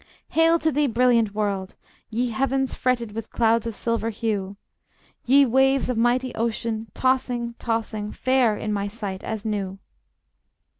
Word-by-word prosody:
Hail 325 +1 +4
to 320 -1 0
thee, 295 +1 +2
brilliant 230 -3 +2
world! 200 -3 -2 0.3
Ye 240 +2 -1
heavens 265 +2 0
fretted 245 -4 0
With 225 +1 -6
clouds 230 0 +2
of 225 - -4
silver 230 0 -1
hue! 205 -3 -3 0.7
Ye 275 +2 +6
waves 265 +1 +3
of - - -2
mighty 245 +2 +1
ocean, 225 0 -2
tossing, 250 -2 0
tossing, 220 -2 -2
Fair 255 -5 +2
in 215 -1 -3
my 200 0 -1
sight 200 -2 -6
as 220 -1 -4
new! 200 -3 -2
230 Hz, 145 wpm, -24 LUFS, 215-255 Hz, 0.7 s, Ye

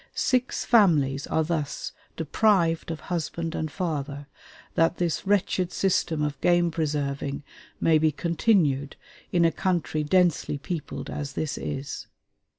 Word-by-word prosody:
Six 255 0 0
families 150 - +4
are 160 - +1
thus 155 -3 -3 0.3
deprived 165 0 +2
of 160 -2 -4
husband 170 -1 -3
and 155 -2 -3
father, 145 -4 -3 0.5
that 165 +1 +2
this 175 +1 -1
wretched 185 -2 +1
system 170 -5 +1
of 145 -2 -3
game 175 -1 +3
preserving 145 -3 -2 0.4
may 160 -1 +4
be 155 0 +3
continued 155 - +1 0.4
in 170 -2 +3
a 165 - +4
country 170 -5 -1
densely 170 -2 +2
peopled 155 0 -5
as 145 -1 -4
this 155 -2 -2
is. 140 -1 -5
160 Hz, 130 wpm, -26 LUFS, 145-175 Hz, 0.5 s, families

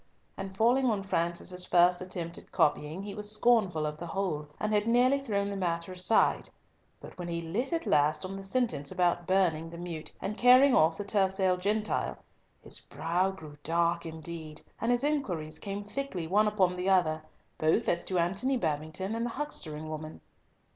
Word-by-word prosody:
And 195 0 -7
falling 250 +4 +3
on 210 -4 0
Francis's 180 0 0
first 175 0 +4
attempt 175 -2 -4
at - - -16
copying, 150 +5 +1
he 200 0 -6
was 210 0 -3
scornful 210 -8 +3
of 150 0 -4
the 170 - -6
whole, 165 -5 -2
and 215 0 -1
had 210 +1 +2
nearly 250 +4 +4
thrown 200 -7 -1
the 200 - -4
matter 170 -2 -2
aside, 185 +4 +2 0.5
but - - -11
when 175 - -4
he 170 -1 -2
lit 210 +11 -2
at 335 0 -1
last 150 +2 +2
on 190 +1 -5
the 195 - -6
sentence 195 - -1
about 175 -2 +1
burning 175 -4 +2
the 170 - -9
meute 170 -2 -6
and 210 +2 -4
carrying 255 +2 +7
off 160 -3 +4
the - - -3
tercel 190 -2 +2
gentle, 210 +4 -1 0.5
his - - -3
brow 170 +6 -1
grew 155 -6 -10
dark 170 +1 +1
indeed, 160 -1 -6 0.2
and 230 - +1
his 245 +1 +1
inquiries 185 - -2
came 200 0 -4
thickly 205 -5 -4
one 205 +6 +3
upon 190 -4 +2
the 180 +2 -1
other, 160 -5 +3 0.4
both 160 +9 +2
as 170 - +1
to 185 - -1
Antony 195 +10 +1
Babington 160 +3 -2
and 230 +1 -2
the 240 - -1
huckstering 155 - -4
woman. 155 0 -7
185 Hz, 180 wpm, -30 LUFS, 165-210 Hz, 0.5 s, carrying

